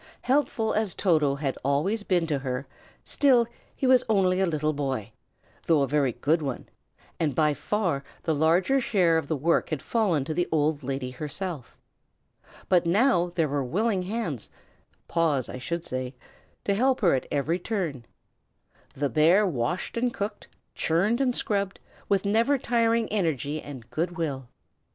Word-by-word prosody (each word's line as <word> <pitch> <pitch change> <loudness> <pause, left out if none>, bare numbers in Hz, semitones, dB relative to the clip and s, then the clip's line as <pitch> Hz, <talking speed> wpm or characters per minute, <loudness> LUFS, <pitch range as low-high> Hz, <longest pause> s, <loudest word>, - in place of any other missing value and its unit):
Helpful 250 -5 +1
as 215 -3 0
Toto 155 -7 +2
had 140 -2 -3
always 150 - +1
been 180 -4 +1
to 150 -4 -1
her, 130 0 -3 0.4
still, 255 -5 +4 0.3
he - - -2
was 255 -1 +5
only 190 -3 +3
a 190 - +2
little 155 -2 0
boy, 135 -7 -3 0.6
though 155 -4 +4
a - - 0
very 140 -2 +1
good 150 +7 +1
one; 135 -4 -4 0.5
and 150 -5 0
by 150 0 +3
far 175 -5 -1 0.2
the 160 - +1
larger 170 - +3
share 180 -9 +3
of 150 - -8
work 160 +2 +1
had 155 - -2
fallen 180 - 0
to 155 - -3
the 175 +2 0
old 155 -1 +1
lady 135 -1 -3
herself. 150 +1 -5 0.9
But 175 -2 +3
now 180 -2 +3
there 165 -3 +2
were 140 -1 -1
willing 195 - 0
hands 180 - -4 0.6
paws, 155 -7 +1
I 125 - -7
should 170 +5 -4
say 130 0 -4 0.5
to 200 - +2
help 255 +5 +2
her 180 - +4
at 130 - -1
every 155 +5 0
turn. 175 - -3 0.9
The 145 +1 0
bear 165 +8 +4
washed 170 - -2
and 245 +1 +1
cooked, 205 -1 -5 0.3
churned 200 +10 +1
and 250 -2 +1
scrubbed, 200 -2 -1 0.3
with 200 0 +2
never 230 +7 +3
tiring 230 -2 +1
energy 155 - -1
and 130 -5 -9
good 175 +3 -2
will. 135 -7 -3
165 Hz, 160 wpm, -26 LUFS, 145-205 Hz, 0.9 s, was